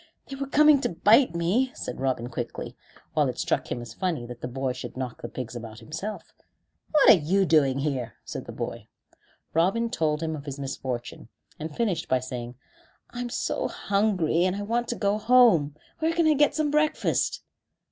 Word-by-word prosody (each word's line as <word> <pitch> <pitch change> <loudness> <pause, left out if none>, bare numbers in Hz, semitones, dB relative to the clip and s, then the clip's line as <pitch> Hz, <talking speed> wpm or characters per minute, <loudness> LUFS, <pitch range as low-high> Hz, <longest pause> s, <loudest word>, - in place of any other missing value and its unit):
"They 275 - -6
were 275 0 -4
coming 300 0 +5
to - - 0
bite 205 +6 +4
me," 200 +10 +1
said - - -6
Robin 130 -3 -1
quickly, 120 -1 -5 0.4
while - - +2
it - - -5
struck - - -1
him 120 - -3
as 115 -2 -10
funny 165 -5 -2
that 120 0 -9
the - - -3
boy 130 +1 -2
should 130 0 -8
knock 125 -2 -5
the 120 - -5
pigs 125 -1 -6
about 115 -2 -8
himself. 195 - -7 0.6
"What 300 -2 +7
are - - +11 0.2
you 195 0 +4
doing 140 -6 +3
here?" 135 -6 -2
said - - -6
the - - -7
boy. - - -6 0.7
Robin 195 +8 +2
told 155 -7 0
of 155 -3 -4
his 140 -1 -5
misfortune, 130 -3 -5 0.3
and 155 0 -6
finished 195 -9 -1
by 130 - +4
saying: 125 -1 -6 0.6
"I'm 245 0 -4
so - - -1
hungry, 195 -5 +1
and 185 +1 +1
I 205 - -4
want 235 +3 -1
to 240 - -2
go 205 -1 0
home. 215 - +5 0.2
Where 320 +1 +1
can 335 0 +2
I 310 - +5
get 295 0 +3
some 305 -2 0
breakfast?" 300 +1 +1
170 Hz, 190 wpm, -26 LUFS, -, 0.7 s, are